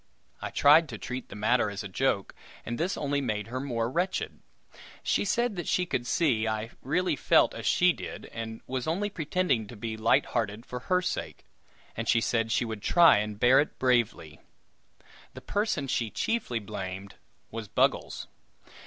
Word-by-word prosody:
I -, -, -3 dB
tried 150 Hz, +2 st, +5 dB
to 110 Hz, -, -6 dB
treat 125 Hz, +4 st, -6 dB
the -, -, -9 dB
matter 110 Hz, +2 st, +2 dB
as 100 Hz, +1 st, -5 dB
a -, -, -5 dB
joke, 100 Hz, 0 st, 0 dB, 0.3 s
and 120 Hz, +1 st, -4 dB
this 175 Hz, +4 st, -1 dB
only 145 Hz, -1 st, 0 dB
made 110 Hz, -4 st, -2 dB
her 130 Hz, +2 st, -3 dB
more 120 Hz, -4 st, -1 dB
wretched. 175 Hz, +9 st, -2 dB, 0.6 s
She -, -, +1 dB
said 235 Hz, +3 st, 0 dB
that 175 Hz, -, -4 dB
she 180 Hz, -, +1 dB
could 125 Hz, -8 st, -2 dB
see 120 Hz, -10 st, +2 dB
I 110 Hz, +1 st, -2 dB
really 180 Hz, +8 st, 0 dB
felt -, -, +4 dB
as -, -, -5 dB
she 180 Hz, 0 st, +4 dB
did, -, -, -8 dB
and 110 Hz, -1 st, -6 dB
was 130 Hz, +2 st, -3 dB
only 200 Hz, +6 st, -1 dB
pretending 155 Hz, -, 0 dB
to 120 Hz, -, -10 dB
be 110 Hz, +1 st, -4 dB
light 115 Hz, +5 st, +3 dB
hearted 115 Hz, -1 st, -2 dB
for 125 Hz, -, -6 dB
her 180 Hz, +8 st, +1 dB
sake, 180 Hz, -, -4 dB, 0.5 s
and 115 Hz, 0 st, -3 dB
she 115 Hz, -, +5 dB
said 115 Hz, -1 st, 0 dB
she 120 Hz, -, +2 dB
would 110 Hz, -2 st, -5 dB
try 170 Hz, -, +6 dB
and 105 Hz, 0 st, -4 dB
bear 125 Hz, +3 st, +6 dB
it 150 Hz, -, -1 dB
bravely. 120 Hz, -11 st, 0 dB, 1.0 s
The -, -, -8 dB
person 205 Hz, -9 st, -1 dB
she 115 Hz, -3 st, 0 dB
chiefly 210 Hz, -, -1 dB
blamed 95 Hz, -2 st, -6 dB, 0.4 s
was 115 Hz, -1 st, -6 dB
Buggles. -, -, 0 dB
120 Hz, 180 wpm, -28 LUFS, 110-160 Hz, 1.0 s, try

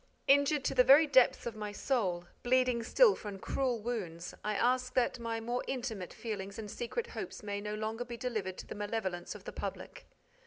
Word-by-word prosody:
Injured 285 Hz, +1 st, +4 dB
to -, -, 0 dB
the 250 Hz, -1 st, +6 dB
very 280 Hz, +5 st, +8 dB
depths 260 Hz, -4 st, +4 dB
of 235 Hz, -2 st, -4 dB
my 210 Hz, -1 st, -4 dB
soul, 200 Hz, -7 st, -1 dB, 0.2 s
bleeding 250 Hz, -1 st, +2 dB
still 435 Hz, -, +5 dB
from 205 Hz, -, -7 dB
cruel 250 Hz, +4 st, -1 dB
wounds, 190 Hz, -7 st, -4 dB
I 210 Hz, 0 st, -1 dB
ask 250 Hz, +3 st, +1 dB
that 250 Hz, -1 st, +2 dB
my 230 Hz, -1 st, -2 dB
more 240 Hz, +2 st, -2 dB
intimate 230 Hz, -8 st, -3 dB
feelings 200 Hz, -4 st, -5 dB
and 210 Hz, -2 st, -6 dB
secret 340 Hz, -, -3 dB
hopes 460 Hz, -, -7 dB
may 205 Hz, -1 st, -3 dB
no 210 Hz, 0 st, -3 dB
longer 220 Hz, +2 st, -3 dB
be 240 Hz, -1 st, -7 dB
delivered 215 Hz, -7 st, -3 dB
to -, -, -7 dB
the -, -, -7 dB
malevolence 205 Hz, -4 st, -3 dB
of -, -, -10 dB
the -, -, -7 dB
public. -, -, -6 dB
230 Hz, 195 wpm, -32 LUFS, 205-255 Hz, 0.2 s, very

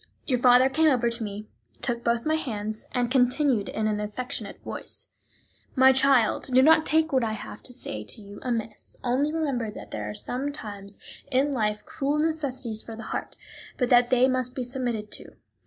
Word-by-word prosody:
Your 255 Hz, -3 st, +1 dB
father 250 Hz, +1 st, +6 dB
came 315 Hz, +4 st, +3 dB
over 240 Hz, -4 st, +2 dB
to 230 Hz, 0 st, -2 dB
me, 210 Hz, 0 st, -6 dB, 0.4 s
took 235 Hz, -2 st, -1 dB
both 235 Hz, 0 st, +1 dB
my 310 Hz, -, +2 dB
hands, 215 Hz, -8 st, -3 dB
and 245 Hz, -1 st, 0 dB
continued 255 Hz, -3 st, +2 dB
in 220 Hz, -, -2 dB
an 210 Hz, -1 st, 0 dB
affectionate 245 Hz, +6 st, -4 dB
voice: -, -, -7 dB, 0.7 s
"My 265 Hz, 0 st, +7 dB
child, 265 Hz, -4 st, +3 dB
do 255 Hz, +1 st, +6 dB
not 315 Hz, +1 st, +6 dB
take 315 Hz, -1 st, +2 dB
what 260 Hz, -2 st, +3 dB
I 220 Hz, -1 st, -1 dB
have 210 Hz, -, -8 dB
to -, -, -7 dB
say 110 Hz, -, -6 dB
to 105 Hz, -, -6 dB
you 205 Hz, -1 st, -11 dB
amiss; 225 Hz, -3 st, -3 dB
only 260 Hz, +5 st, +1 dB
remember 280 Hz, -8 st, -1 dB
that 210 Hz, -, -10 dB
there 105 Hz, -1 st, -4 dB
are 105 Hz, -, -6 dB
sometimes 205 Hz, -, -5 dB, 0.3 s
in 275 Hz, +2 st, +2 dB
life 210 Hz, -4 st, -1 dB
cruel 285 Hz, +2 st, -1 dB
necessities 280 Hz, -8 st, -2 dB
for 225 Hz, -, -9 dB
the 225 Hz, -, -8 dB
heart, -, -, -4 dB, 0.4 s
but 250 Hz, -2 st, +1 dB
that 245 Hz, 0 st, +6 dB
they 255 Hz, 0 st, +5 dB
must 255 Hz, -1 st, -1 dB
be 260 Hz, -, -2 dB
submitted 240 Hz, -4 st, -3 dB
to. -, -, -5 dB
245 Hz, 190 wpm, -26 LUFS, 220-270 Hz, 0.7 s, My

